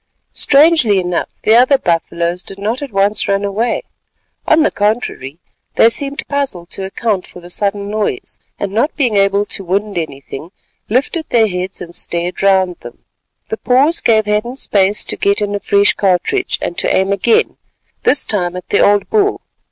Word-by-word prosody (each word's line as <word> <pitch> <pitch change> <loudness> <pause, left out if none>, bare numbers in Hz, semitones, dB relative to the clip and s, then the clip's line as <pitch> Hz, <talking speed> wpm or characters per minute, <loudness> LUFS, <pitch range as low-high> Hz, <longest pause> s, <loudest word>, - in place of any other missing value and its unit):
Strangely 280 - +4
enough 180 -1 -2
the 220 - +4
other 255 +4 +5
buffaloes 170 -2 -1
did 195 - -10
not 220 +6 -2
at 280 -3 -6
once 200 +1 +1
run 200 0 0
away. 220 +4 -1 0.6
On 315 0 +4
the - - +2
contrary, 205 - -2 0.4
they 225 - +6
seemed 280 +4 -2
puzzled 265 -12 -3
to 195 - -5
account 195 0 -2
for - - -12
the 175 0 -10
sudden 200 +1 -1
noise; 215 - -3 0.2
and, 200 - -3
not 235 +9 0
being 250 -7 0
able 200 +1 +2
to 195 - -5
wind 200 +1 -1
anything, 150 +1 -7 0.4
lifted 280 +8 -1
their 225 -2 +3
heads 185 0 -5
and 170 -1 -8
stared 175 +1 -3
round 190 -2 +2
them. - - -13 0.4
The 445 - -3
pause 280 - +2
gave 220 -2 +3
Hadden 210 +4 -1
space 200 -5 +1
to - - -2
get 200 0 +1
in 205 -1 -2
a 205 - -1
fresh 200 0 +3
cartridge 195 - 0
and 175 - -3
to - - 0
aim 190 +1 +1
again, 200 +4 +1 0.4
this 290 - +2
time 180 -4 -1
at 180 - -8
the 205 - +2
old 205 0 +3
bull. 410 -2 +1
205 Hz, 175 wpm, -15 LUFS, 185-240 Hz, 0.6 s, they